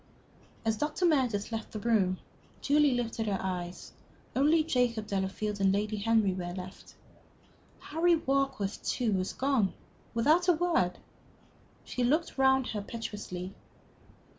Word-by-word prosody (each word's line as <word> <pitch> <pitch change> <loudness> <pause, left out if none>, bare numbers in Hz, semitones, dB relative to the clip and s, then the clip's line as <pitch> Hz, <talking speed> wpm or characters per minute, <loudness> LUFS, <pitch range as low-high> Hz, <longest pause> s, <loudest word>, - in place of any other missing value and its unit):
As 220 -1 +1
Dr. 300 - 0
Meredith 250 -11 +1
left 225 -1 -4
the 215 - -4
room, 205 -5 +2 0.4
Julie 290 -2 +3
lifted 230 -2 -2
her 200 -2 +1
eyes. 180 -1 -4 0.4
Only 305 +4 +4
Jacob 245 -7 +1
Delafield 200 +1 -2
and 195 -1 +4
Lady 210 +2 -1
Henry 215 -2 +2
were 175 -1 -5
left. 185 0 -9 0.8
Harry 335 +3 +2
Warkworth, 270 -9 -1
too, 235 -5 0
was 185 -1 -1
gone 260 -8 +1 0.4
without 310 +10 +3
a 355 - +6
word? 320 - +1 0.9
She 250 - -3
looked 300 +3 +1
round 265 -1 +4
her 210 - -3
piteously. 200 -4 -6
225 Hz, 130 wpm, -30 LUFS, 195-275 Hz, 0.9 s, a